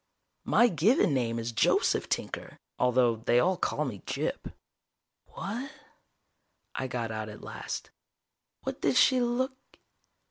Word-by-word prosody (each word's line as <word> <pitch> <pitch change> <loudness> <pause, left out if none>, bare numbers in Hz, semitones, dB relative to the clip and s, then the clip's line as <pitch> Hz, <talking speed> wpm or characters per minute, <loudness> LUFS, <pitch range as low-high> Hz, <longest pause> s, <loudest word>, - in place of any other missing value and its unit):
My 240 - +5
given 195 - +3
name 120 -3 0
is 115 0 -3
Joseph 115 - +2
Tinker - - -3 0.2
although 125 -2 +3
they 120 +2 +2
all 185 +8 +3
call 155 -3 -1
me 110 -8 -5
Gyp. - - -3 0.8
"What 235 +8 -5 0.6
..." - - -49
I 130 - -3
got 120 -3 -3
out 110 0 -4
at 105 - -11
last. - - -6 0.7
"What - - -4
did 140 - +2
she 255 -2 +5
look...?" 250 +2 0
130 Hz, 135 wpm, -29 LUFS, -, 0.8 s, My